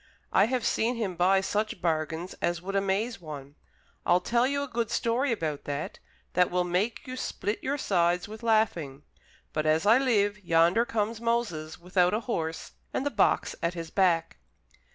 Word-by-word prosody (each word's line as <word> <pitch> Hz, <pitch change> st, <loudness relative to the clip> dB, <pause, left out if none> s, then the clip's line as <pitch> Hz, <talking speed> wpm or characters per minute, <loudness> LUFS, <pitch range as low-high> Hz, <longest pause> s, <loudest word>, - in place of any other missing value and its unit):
I -, -, +6 dB
have 250 Hz, 0 st, -1 dB
seen 235 Hz, +3 st, +1 dB
him 205 Hz, -6 st, -2 dB
buy 190 Hz, +3 st, +4 dB
such 210 Hz, +1 st, -1 dB
bargains 160 Hz, +1 st, -1 dB
as 175 Hz, 0 st, 0 dB
would 195 Hz, +3 st, -5 dB
amaze 200 Hz, +3 st, 0 dB
one. 145 Hz, -3 st, -8 dB, 0.5 s
I'll 175 Hz, -, +4 dB
tell 235 Hz, +5 st, +2 dB
you 280 Hz, +1 st, -1 dB
a -, -, -4 dB
good 235 Hz, -3 st, -2 dB
story 240 Hz, +4 st, +1 dB
about 155 Hz, -9 st, -2 dB
that, 145 Hz, +1 st, -4 dB, 0.3 s
that 180 Hz, 0 st, +3 dB
will 180 Hz, 0 st, +1 dB
make 180 Hz, +6 st, -1 dB
you 255 Hz, -, -6 dB
split 215 Hz, -4 st, -3 dB
your 280 Hz, +2 st, -1 dB
sides 175 Hz, -7 st, +1 dB
with 215 Hz, +1 st, -9 dB
laughing. 190 Hz, -, +1 dB, 0.5 s
But, 155 Hz, 0 st, 0 dB
as 155 Hz, +4 st, +2 dB
I 225 Hz, +5 st, +6 dB
live, 210 Hz, -5 st, +1 dB
yonder 170 Hz, +6 st, +4 dB
comes 225 Hz, -2 st, -2 dB
Moses, 205 Hz, -10 st, -1 dB
without 180 Hz, +2 st, +2 dB
a 220 Hz, -, -1 dB
horse, 165 Hz, -9 st, -3 dB, 0.2 s
and 265 Hz, -, -2 dB
the 285 Hz, -, 0 dB
box 210 Hz, -, +2 dB
at 170 Hz, +1 st, -1 dB
his 165 Hz, -1 st, -6 dB
back." 175 Hz, -, +2 dB
195 Hz, 175 wpm, -28 LUFS, 170-230 Hz, 0.5 s, I